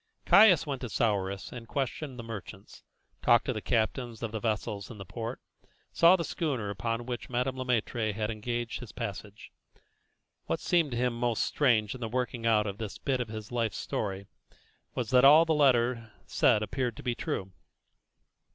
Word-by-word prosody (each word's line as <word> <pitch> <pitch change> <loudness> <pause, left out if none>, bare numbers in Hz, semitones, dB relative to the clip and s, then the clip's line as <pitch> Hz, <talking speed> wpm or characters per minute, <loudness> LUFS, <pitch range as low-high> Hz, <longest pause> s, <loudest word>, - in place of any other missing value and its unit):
Caius 200 -7 +7
went 140 -4 -4
to 125 - -4
Souris 100 -4 -1
and 120 -2 -9
questioned 135 +1 -3
the 120 - -6
merchants, 105 -3 -9 0.4
talked 120 -1 +4
to 130 - -1
the 110 - -4
captains 120 +1 -1
of 115 - -3
the 110 - -3
vessels 105 -2 -2
in 115 - -9
the 100 - -8
port, 115 +5 -5 0.5
saw 170 +2 +6
the 170 - -2
schooner 130 -13 -2
upon 115 +4 -3
which 120 -1 -5
Madame 125 +1 -1
Le 130 - -3
Maître 115 -2 0
had 105 +1 -2
engaged 120 +2 -3
his 125 -4 -9
passage. 100 +1 -7 1.0
What - - -1
seemed 170 -4 +2
to 120 - -4
him 125 0 +1
most 120 -1 0
strange 110 -8 +2
in 130 - -10
the 115 - -3
working 120 -1 -2
out 105 -2 +3
of 100 0 -5
this 110 -4 -5
bit 130 -2 -1
of 120 - -3
his 110 0 -8
life's 115 -5 -1
story, 100 -2 -3 0.7
was 120 -4 -3
that 125 0 +5
all 150 +4 +8
that 160 - +2
the 150 - 0
letter 120 -4 +2
said 105 - +3
appeared 120 +2 -2
to - - -9
be 125 - 0
true. 95 -4 -4
120 Hz, 190 wpm, -29 LUFS, 110-125 Hz, 1.0 s, all